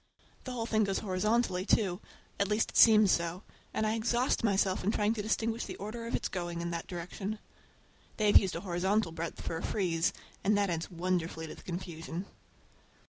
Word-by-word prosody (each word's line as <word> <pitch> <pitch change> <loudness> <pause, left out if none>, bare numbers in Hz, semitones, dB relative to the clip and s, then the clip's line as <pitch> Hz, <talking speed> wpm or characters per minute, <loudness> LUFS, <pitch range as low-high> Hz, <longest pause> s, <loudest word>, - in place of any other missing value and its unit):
The 255 - -4
whole 235 -2 -2
thing 220 -1 +2
goes 195 -1 0
horizontally, 200 -1 +1
too, 195 -2 +1 0.4
at 200 - +2
least 210 +2 +1
it - - -3
seems 215 -3 +8
so, 170 +3 0 0.3
and 215 - 0
I 215 - +1
exhaust 240 +3 +1
myself 195 -3 +2
in 195 - +1
trying 210 0 +2
to 220 - -3
distinguish 225 +2 -1
the - - -6
order 230 +3 -6
of 235 - -1
its - - -1
going 175 -2 -4
in 170 0 -3
that 170 -1 -4
direction. 190 +4 -5 0.8
They 215 - +1
have 205 - +8
used 190 -3 -2
a - - -3
horizontal 190 0 0
breadth 165 +1 -5
for 165 - -3
a - - -5
frieze, 170 -5 +1 0.3
and 205 +1 +3
that 200 -2 +2
adds 165 -1 -2
wonderfully 175 -2 -2
to 160 - -7
the - - -13
confusion. 175 0 -5
195 Hz, 195 wpm, -31 LUFS, 175-215 Hz, 0.8 s, seems